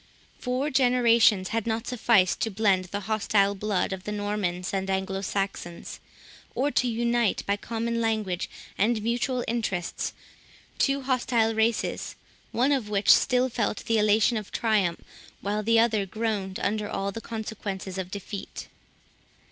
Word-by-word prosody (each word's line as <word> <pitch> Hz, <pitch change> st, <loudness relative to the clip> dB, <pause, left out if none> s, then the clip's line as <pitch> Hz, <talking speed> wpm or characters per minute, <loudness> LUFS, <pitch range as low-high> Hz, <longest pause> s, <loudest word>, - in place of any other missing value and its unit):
Four 260 Hz, +4 st, -1 dB
generations 235 Hz, -6 st, +4 dB
had 225 Hz, 0 st, -2 dB
not 225 Hz, +1 st, -1 dB
sufficed 225 Hz, -7 st, +3 dB
to 225 Hz, -, 0 dB
blend 195 Hz, -3 st, +2 dB
the 200 Hz, +3 st, -4 dB
hostile 200 Hz, -1 st, +2 dB
blood 200 Hz, -1 st, -1 dB
of 185 Hz, -1 st, -6 dB
the 210 Hz, -, -4 dB
Normans 205 Hz, -4 st, -2 dB
and 195 Hz, 0 st, -1 dB
Anglo 190 Hz, 0 st, -1 dB
Saxons, 195 Hz, -3 st, -4 dB, 0.6 s
or 275 Hz, +4 st, +1 dB
to 255 Hz, -, +2 dB
unite, 235 Hz, -1 st, +1 dB
by 200 Hz, -, +1 dB
common 230 Hz, +2 st, -2 dB
language 215 Hz, -5 st, -1 dB, 0.3 s
and 215 Hz, +1 st, +2 dB
mutual 245 Hz, +2 st, 0 dB
interests, 210 Hz, -7 st, -2 dB, 0.7 s
two 275 Hz, -1 st, +2 dB
hostile 240 Hz, -3 st, +1 dB
races, 220 Hz, +1 st, 0 dB, 0.4 s
one 255 Hz, +5 st, +2 dB
of 255 Hz, -7 st, 0 dB
which 205 Hz, -1 st, +5 dB
still 250 Hz, 0 st, +3 dB
felt 225 Hz, -4 st, -2 dB
the 225 Hz, -1 st, +2 dB
elation 215 Hz, +3 st, +3 dB
of 210 Hz, -2 st, -6 dB
triumph, 205 Hz, -7 st, +1 dB, 0.4 s
while 210 Hz, +1 st, -1 dB
the 230 Hz, +2 st, +3 dB
other 220 Hz, -4 st, +2 dB
groaned 205 Hz, -2 st, -2 dB
under 210 Hz, 0 st, -1 dB
all 195 Hz, 0 st, -2 dB
the 225 Hz, -, -7 dB
consequences 205 Hz, -4 st, -5 dB
of 185 Hz, -1 st, -4 dB
defeat. 200 Hz, +1 st, -7 dB
215 Hz, 145 wpm, -26 LUFS, 195-235 Hz, 0.7 s, which